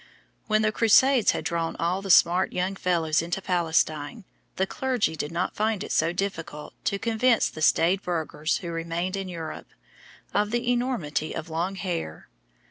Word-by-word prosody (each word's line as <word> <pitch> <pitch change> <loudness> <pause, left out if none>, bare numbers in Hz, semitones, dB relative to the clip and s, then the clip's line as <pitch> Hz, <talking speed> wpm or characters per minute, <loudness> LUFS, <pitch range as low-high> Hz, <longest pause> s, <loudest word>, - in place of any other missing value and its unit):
When 215 0 +2
the 215 - +2
Crusades 240 +3 +4
had - - 0
drawn 165 -1 -1
all 175 +3 -1
the 195 - -7
smart 175 +1 +5
young 185 +2 -1
fellows 165 -4 +1
into 170 +3 -3
Palestine, 165 0 0 0.3
the 190 - +1
clergy 250 -6 -1
did 150 0 -4
not 170 +2 -2
find 215 -1 0
it - - -7
so 165 - +2
difficult 175 -5 -4
to 200 -3 +1
convince 230 +2 +2
the 155 - -9
staid 175 +4 +3
burghers 160 -3 -2
who 170 -2 -6
remained 170 +3 -3
in 195 -1 -4
Europe, 165 -3 -7 0.7
of 210 0 +1
the 240 +2 0
enormity 235 - -1
of 160 +1 -6
long 175 +4 -2
hair. 175 - -5
180 Hz, 165 wpm, -26 LUFS, 165-210 Hz, 0.7 s, smart